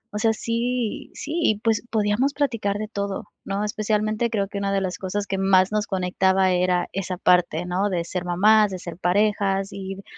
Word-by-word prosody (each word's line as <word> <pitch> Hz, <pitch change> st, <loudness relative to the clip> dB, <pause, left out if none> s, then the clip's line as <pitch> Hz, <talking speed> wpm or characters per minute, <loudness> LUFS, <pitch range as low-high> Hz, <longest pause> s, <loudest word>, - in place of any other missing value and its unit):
O -, -, -1 dB
sea, 225 Hz, 0 st, +3 dB
sí 235 Hz, 0 st, -2 dB
sí, 300 Hz, -, -6 dB
y 215 Hz, -, +3 dB
pues, 225 Hz, 0 st, +1 dB
podíamos 220 Hz, +6 st, +1 dB
platicar 230 Hz, -8 st, 0 dB
de 215 Hz, 0 st, -4 dB
todo, 200 Hz, -2 st, -4 dB, 0.2 s
¿no?, 200 Hz, +1 st, -2 dB
especialmente 215 Hz, +2 st, 0 dB
creo 200 Hz, -3 st, -1 dB
que, 200 Hz, 0 st, -5 dB
una 200 Hz, 0 st, -1 dB
de 195 Hz, -, +2 dB
las 185 Hz, -1 st, -3 dB
cosas 200 Hz, +2 st, -3 dB
que 195 Hz, -1 st, -3 dB
más 190 Hz, 0 st, +4 dB
nos 210 Hz, 0 st, 0 dB
conectaba, 190 Hz, 0 st, +2 dB
era 180 Hz, -1 st, +1 dB
esa 185 Hz, -1 st, -3 dB
parte, 180 Hz, -2 st, +2 dB
¿no?, 185 Hz, +3 st, 0 dB
de 175 Hz, -3 st, -1 dB
ser 180 Hz, 0 st, -4 dB
mamás, 210 Hz, +4 st, +4 dB
de 185 Hz, -, -4 dB
ser 170 Hz, -2 st, -8 dB
parejas, 195 Hz, +1 st, +1 dB
y 195 Hz, 0 st, -7 dB
200 Hz, 195 wpm, -23 LUFS, 185-215 Hz, 0.2 s, más